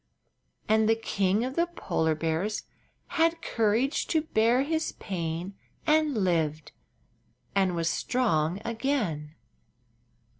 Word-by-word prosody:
And 220 0 +3
the 225 - +5
King 200 0 0
of 260 +1 -4
the 340 +1 +2
Polar 160 - -1
Bears 165 +7 -1 0.5
had 330 0 +2
courage 230 +5 +1
to 315 -2 +1
bear 240 -2 +3
his 315 +2 -1
pain 170 0 -4 0.3
and 305 -8 +3
lived 155 -4 0 0.8
and 190 -3 +2
was 165 -1 0
strong 175 -5 +1
again. 220 - -2
215 Hz, 110 wpm, -28 LUFS, 165-265 Hz, 0.8 s, the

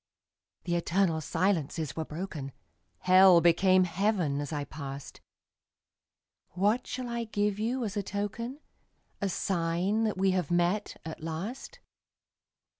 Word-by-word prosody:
The 175 - -1
eternal 170 -1 +1
silences 165 -3 -1
were 160 - -3
broken; 155 -5 -6 0.5
Hell 185 -1 +7
became 185 +2 +5
Heaven 180 -5 0
as 145 - -5
I 145 -2 -2
passed. 140 -1 -8 1.3
What 205 +8 +1
shall 255 -1 -4
I 235 -1 -3
give 205 -1 -1
you 240 +3 -1
as 205 -1 -4
a 205 - 0
token, 210 +8 -4 0.6
A 200 - 0
sign 185 +4 0
that 215 -3 -1
we 190 0 +3
have 180 -4 -1
met, 175 +4 0
at 160 -1 -7
last? 200 - -6
185 Hz, 125 wpm, -29 LUFS, 165-205 Hz, 1.3 s, Hell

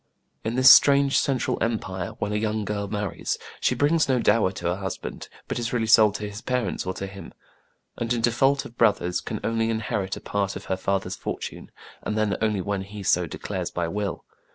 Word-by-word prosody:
In 110 +2 -2
this 130 +1 +9
strange 140 -1 +6
Central 135 -3 0
Empire, 95 -5 -2
when 105 0 -2
a - - 0
young 110 0 -1
girl 100 -1 -2
marries, 105 -2 -3 0.2
she 125 - +1
brings 150 +4 +2
no 130 - +3
dower 110 -4 +3
to 85 - -8
her 90 +2 0
husband, 95 -1 -6 0.2
but - - -3
is 115 0 -3
really 115 -2 +1
sold 110 -2 +6
to 105 - -4
his 105 +2 -8
parents 125 -6 -2
or 95 - -2
to 95 - -4
him; 95 0 -10 0.6
and, 115 0 -3
in 120 -1 +1
default 135 +4 +2
of 120 - -12
brothers, 90 -3 +2
can 110 - -4
only 115 0 0
inherit 105 -4 -2
a - - -7
part 100 -1 -2
of - - -7
her 95 - -1
father's 95 -1 -1
fortune, - - -6 0.3
and 105 - -3
then 110 -2 +1
only 105 -3 +1
when 100 +1 -2
he 100 +1 -8
so 90 -2 +2
declares - - -4
by 85 -1 -2
will. 100 +1 -3
105 Hz, 205 wpm, -25 LUFS, 95-115 Hz, 0.6 s, this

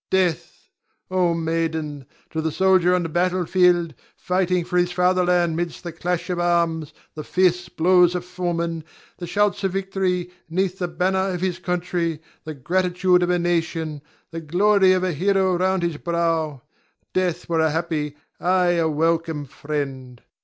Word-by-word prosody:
Ion. - - -74 0.2
Death! 160 - -16 0.4
Oh, 180 -2 +2
maiden! 160 -4 -2 0.2
To 160 - -2
the 160 0 -1
soldier 185 0 +3
on 180 - 0
the - - -2
battle 180 +2 0
field, 175 -2 +3 0.2
fighting 180 -1 0
for 180 - 0
his 175 0 +1
father 180 +1 +2
land 175 -2 +2
'mid 175 +1 -1
the 175 - -8
clash 175 +1 -3
of 175 - -2
arms, 170 -3 +1 0.2
the 155 - -7
fierce 180 0 +1
blows 180 +1 +4
of 175 0 -3
foemen, 170 -2 -3 0.4
the 175 - -5
shouts 205 +1 +1
of 190 -1 0
victory; 190 -2 -1 0.2
'neath 185 +2 -1
the 180 - -1
banner 190 +2 0
of 180 -2 -3
his 185 -1 -1
country, 175 -3 -2 0.3
the 155 -1 -6
gratitude 180 +4 +1
of 175 - +1
a 180 - +3
nation, 165 -3 -1 0.3
the 165 0 -5
glory 190 +4 +4
of 185 0 0
a 185 -2 0
hero 190 +3 +2
round 185 0 +1
his 170 -3 -1
brow, 165 -5 -1 0.5
death 185 -3 -1
were 165 -1 0
a 160 0 +3
happy, 155 -2 -2 0.2
ay, 180 0 +2
a 165 -1 +2
welcome 160 -1 0
friend. 135 -3 -5
175 Hz, 165 wpm, -22 LUFS, 160-180 Hz, 0.5 s, blows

